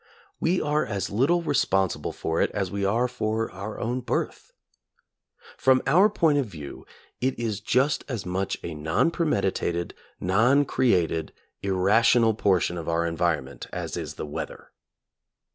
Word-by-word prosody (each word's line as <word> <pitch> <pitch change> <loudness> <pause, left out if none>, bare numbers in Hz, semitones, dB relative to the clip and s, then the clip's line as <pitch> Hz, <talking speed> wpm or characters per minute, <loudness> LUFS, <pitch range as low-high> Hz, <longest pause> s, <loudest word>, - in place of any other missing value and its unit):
We 180 +3 +1
are 150 +1 +1
as 100 -3 -3
little 145 +11 +2
responsible 95 - +1
for 80 0 -2
it - - +2
as 95 -3 -1
we 100 0 -2
are 115 +6 +2
for 110 -2 -2
our 100 +3 -7
own 120 +2 -1
birth. - - -3 1.1
From 130 0 +4
our 180 +10 +5
point 160 -8 +2
of 135 - -1
view 75 -8 -9 0.3
it 130 +1 0
is 110 -4 -2
just 130 +7 +1
as 120 -8 -4
much 95 +2 -2
a 85 - -4
non 80 - +1
premeditated, 95 - -1 0.3
non 120 +10 +3
created, 90 - +1 0.3
irrational 110 +4 +3
portion 90 -4 +1
of 80 - -5
our 85 0 +1
environment, 85 -1 -2
as - - -4
is - - -5
the - - -5
weather. 75 - -7
105 Hz, 145 wpm, -26 LUFS, 90-130 Hz, 1.1 s, our